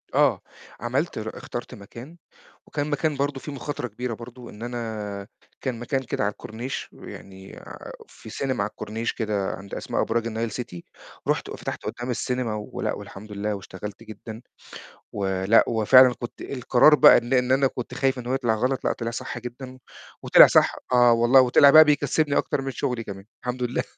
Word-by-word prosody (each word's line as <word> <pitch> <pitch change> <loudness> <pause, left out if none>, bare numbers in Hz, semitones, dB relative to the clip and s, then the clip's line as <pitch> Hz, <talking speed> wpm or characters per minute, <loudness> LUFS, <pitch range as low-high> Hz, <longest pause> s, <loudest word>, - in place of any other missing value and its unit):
آه. - - +3 0.4
عَمَلت - - -2
اخترت - - -6
مكان، 120 +10 -11 0.5
وكان 145 0 -3
مكان 150 +1 0
برضه، 140 0 -1
فيه 150 - -8
مخاطرة 140 -2 -5
كبيرة 120 +2 -5
برضه، 120 +2 -10
إن 105 +2 -10
أنا 110 -4 -5 0.3
كان 125 -4 -3
مكان 130 +3 -2
كده - - -3
على 105 - +1
الكورنيش، 115 +5 -7
يعني 95 0 -11 0.5
في - - -14
سينما 130 -2 -2
على 105 - -3
الكورنيش 110 +2 -4
كده 105 -3 -2
عند 100 0 -12
أسماء - - -2
أبراج 115 0 -1
النايل 115 0 -3
سيتي، 95 -7 -7 0.4
رُحت - - 0
وفتحت - - -6
قدّام 120 +1 -5
السينما 125 -2 -2
ولأ 105 -1 -4
والحمد 105 +2 -10
لله، 105 +1 -2
واشتغلت 100 +1 -9
جدًا، 110 +1 -10 0.7
ولأ 95 +2 +2
وفعلًا 125 +3 +6
كنت 120 - -8
القرار 135 +3 +4
بقى - - +8
إن 120 +3 -2
إن 125 0 +2
أنا 135 +1 +4
كنت 125 -1 -7
خايف 135 0 0
إن 120 - -8
هو 125 - -1
يطلَع 120 -4 +1
غَلَط 125 +3 -1
لأ - - +2
طِلِع 115 -1 -4
صح 115 - -6
جدًا، 125 +2 -9 0.5
وطِلِع - - +8
صح - - +3 0.2
آه 120 -1 +6
والله، 120 +3 +5
وطِلِع 130 +3 +6
بقى 155 +3 +10
بيكسِّبني 145 0 +1
أكتر 145 - 0
من 135 0 -4
شغلي 125 -2 -3
كمان، 95 -2 -9 0.2
الحمد 125 0 -3
لله. 120 0 -1
120 Hz, 175 wpm, -24 LUFS, 110-130 Hz, 0.7 s, بقى